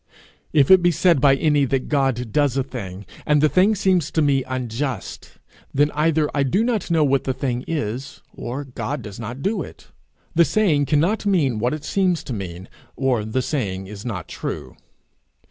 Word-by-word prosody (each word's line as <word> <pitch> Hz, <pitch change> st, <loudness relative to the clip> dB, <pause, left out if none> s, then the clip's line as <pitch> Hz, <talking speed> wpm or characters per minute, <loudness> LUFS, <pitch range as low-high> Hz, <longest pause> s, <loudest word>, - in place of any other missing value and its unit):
If 145 Hz, -1 st, +4 dB
it 190 Hz, -1 st, +8 dB
be 175 Hz, -, +4 dB
said 170 Hz, -3 st, +3 dB
by 135 Hz, -1 st, +6 dB
any 145 Hz, 0 st, +2 dB
that 135 Hz, 0 st, -1 dB
God 135 Hz, -5 st, 0 dB
does 140 Hz, 0 st, +2 dB
a 135 Hz, -, +2 dB
thing, 100 Hz, -7 st, -7 dB, 0.2 s
and 150 Hz, 0 st, +3 dB
the 155 Hz, -, +5 dB
thing 190 Hz, +7 st, +3 dB
seems 185 Hz, -6 st, +1 dB
to 160 Hz, -, 0 dB
me 140 Hz, -2 st, +2 dB
unjust, 130 Hz, -2 st, -4 dB, 0.4 s
then 145 Hz, +2 st, +3 dB
either 155 Hz, 0 st, +2 dB
I 140 Hz, -, +1 dB
do 140 Hz, -, +2 dB
not 230 Hz, -5 st, -1 dB
know 165 Hz, -2 st, +3 dB
what 140 Hz, -1 st, +1 dB
the 130 Hz, -, -1 dB
thing 125 Hz, -3 st, -2 dB
is, 135 Hz, -3 st, -4 dB, 0.2 s
or 130 Hz, +4 st, -5 dB
God 135 Hz, 0 st, -5 dB
does 105 Hz, 0 st, -9 dB
not 120 Hz, +4 st, -6 dB
do 200 Hz, -1 st, 0 dB
it. -, -, -11 dB, 0.4 s
The 170 Hz, -, +5 dB
saying 165 Hz, -8 st, +2 dB
cannot 175 Hz, +8 st, +1 dB
mean 145 Hz, -, +2 dB
what 120 Hz, +6 st, 0 dB
it 150 Hz, -, -9 dB
seems 185 Hz, -4 st, +1 dB
to 130 Hz, -, -5 dB
mean, 95 Hz, -3 st, -6 dB, 0.3 s
or 130 Hz, -5 st, 0 dB
the 110 Hz, +4 st, -2 dB
saying 100 Hz, -11 st, -2 dB
is 100 Hz, +1 st, -9 dB
not 100 Hz, -9 st, -5 dB
true. -, -, -6 dB
140 Hz, 190 wpm, -22 LUFS, 120-160 Hz, 0.4 s, it